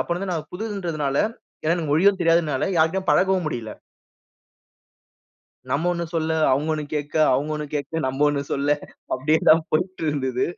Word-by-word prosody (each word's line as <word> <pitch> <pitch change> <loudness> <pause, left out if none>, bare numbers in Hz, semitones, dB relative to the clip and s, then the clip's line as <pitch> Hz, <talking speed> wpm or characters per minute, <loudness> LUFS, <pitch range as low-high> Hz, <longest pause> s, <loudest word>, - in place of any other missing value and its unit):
அப்பலருந்து 180 +2 -2
நான் 155 -3 -4
புதுதுன்றதுனால 175 -9 -3 0.5
ஏன்னா 165 +2 +3
எனக்கு 160 -4 -3
மொழியும் 190 +4 +4
தெரியாதுனால 165 -5 +2
யார்கிட்டையும் 175 +4 +2
பழகவும் 190 -1 +3
முடில. 120 -7 -4 2.0
நம்ம 160 +7 +1
ஒண்ணு 170 0 -3
சொல்ல, 160 0 0 0.2
அவங்க 140 +4 +1
ஒண்ணு 150 - -3
கேக்க, 145 0 -4 0.2
அவங்க 140 +4 0
ஒண்ணு 150 - -4
கேக்க, 150 +2 -2
நம்ப 130 +1 -3
ஒண்ணு 140 -1 -1
சொல்ல. 145 +1 +1 0.4
அப்டியேதான் 155 +3 +4
போயிட்டுருந்தது. 150 -7 -1
155 Hz, 135 wpm, -23 LUFS, 145-175 Hz, 2.0 s, மொழியும்